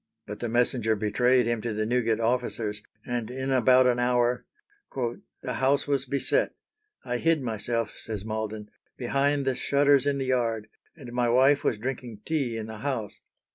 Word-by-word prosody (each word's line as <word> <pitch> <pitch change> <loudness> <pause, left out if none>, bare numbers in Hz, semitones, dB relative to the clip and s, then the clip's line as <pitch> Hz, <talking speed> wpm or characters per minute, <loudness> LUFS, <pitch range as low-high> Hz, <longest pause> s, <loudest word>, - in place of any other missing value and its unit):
But 105 - -7
the 120 - -3
messenger 120 -1 +1
betrayed 120 +4 +2
him 120 -1 -1
to 115 -2 -3
the 110 0 0
Newgate 115 -1 +1
officers, 115 -3 -1 0.2
and 120 -2 -3
in 130 +2 -3
about 130 0 +5
an 120 -1 +3
hour 125 0 +1 0.5
"the 125 0 -4
house 135 +2 +2
was 140 -2 0
beset. 140 - 0 0.5
I 125 0 -1
hid 160 +1 +2
myself," 115 0 -2
says 105 -2 -5
Malden, 110 -1 -4 0.3
"behind 140 +3 +1
the 130 - +2
shutters 140 +2 +3
in 140 -1 +1
the 135 - -2
yard, 115 -4 0 0.3
and 130 -7 -10
my 120 -1 +1
wife 135 +4 +4
was 110 - +1
drinking 120 -2 -5
tea 140 -8 -1
in 110 - -4
the 110 -1 -8
house. 115 -5 -3
120 Hz, 170 wpm, -27 LUFS, 110-130 Hz, 0.5 s, about